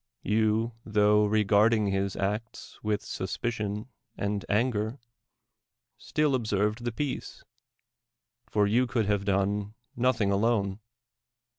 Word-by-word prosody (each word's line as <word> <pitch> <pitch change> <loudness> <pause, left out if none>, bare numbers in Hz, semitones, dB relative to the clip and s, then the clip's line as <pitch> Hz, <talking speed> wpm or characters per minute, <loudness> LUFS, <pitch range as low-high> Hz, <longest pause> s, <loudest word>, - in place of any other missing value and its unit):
You, 110 +2 +1
tho 105 0 +3
regarding 105 0 +3
his 95 0 -1
acts 105 +3 -4
with 105 -1 0
suspicion 105 +2 -3 0.3
and 100 0 -2
anger, 110 +1 0 1.0
still 150 -2 0
observed 110 -1 0
the 120 - 0
peace; 140 +3 -4 1.0
for 105 -1 +2
you 120 +5 +2
could 120 -3 0
have 100 -1 0
done 100 +1 0 0.2
nothing 115 -5 +2
alone. 100 -1 +1
105 Hz, 105 wpm, -28 LUFS, 100-115 Hz, 1.0 s, tho